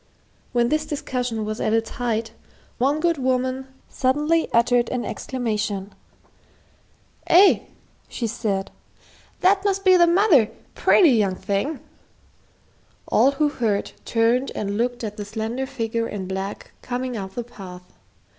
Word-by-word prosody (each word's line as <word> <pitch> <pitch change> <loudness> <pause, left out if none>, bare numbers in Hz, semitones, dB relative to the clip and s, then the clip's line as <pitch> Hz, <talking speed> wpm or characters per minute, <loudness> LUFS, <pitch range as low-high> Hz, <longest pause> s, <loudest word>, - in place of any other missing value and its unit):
When 240 -1 +2
this 305 +1 0
discussion 250 -6 -3
was 215 +1 -4
at 215 - +1
its 225 0 0
height, 225 -2 -2 0.5
one 280 +5 +2
good 335 -2 +1
woman 260 0 -1 0.2
suddenly 300 +5 +1
uttered 240 +1 +3
an 250 -2 -2
exclamation. 210 -5 -3 1.3
"Eh," 380 +4 +6 0.5
she 240 - -4
said, 205 -3 -2 0.7
"that 385 +1 +4
must 390 -1 0
be 370 -1 +7
the 345 -1 +6
mother, 340 - +4 0.2
pretty 345 -7 +5
young 205 -6 +2
thing." 200 +10 -2 1.3
All 275 - +4
who 295 +1 +1
heard 220 -7 -1
turned 235 +3 +1
and 200 -1 -2
looked 240 +2 -1
at 210 -1 -5
the 210 - -4
slender 220 +5 -4
figure 230 -3 -2
in 190 -3 -5
black 190 +1 -5
coming 250 0 -3
up 195 -3 -6
the 240 - -3
path. 180 -6 -12
240 Hz, 135 wpm, -23 LUFS, 215-275 Hz, 1.3 s, be